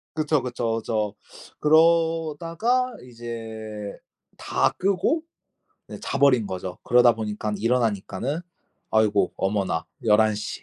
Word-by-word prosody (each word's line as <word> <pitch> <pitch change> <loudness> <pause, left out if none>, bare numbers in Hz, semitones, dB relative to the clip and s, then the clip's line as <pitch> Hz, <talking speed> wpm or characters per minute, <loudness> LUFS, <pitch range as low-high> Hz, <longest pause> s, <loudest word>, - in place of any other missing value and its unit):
그쵸, 155 -2 +1
그쵸, 120 -2 -2
그쵸. 110 -2 -2 0.5
그러다가 165 +9 +2
이제 110 -3 -7 0.4
다 - - +1
끄고 200 - +1 0.7
이제 - - -9
자버린 130 -6 +3
거죠. 90 -1 -5
그러다 120 -2 +5
보니깐 105 -1 -3
일어나니까는 115 - 0 0.5
아이고 105 -4 +2
어머나 95 -4 -1 0.2
11 110 0 +4
시. 105 - -5
115 Hz, 230 characters per minute, -24 LUFS, 105-155 Hz, 0.7 s, 그러다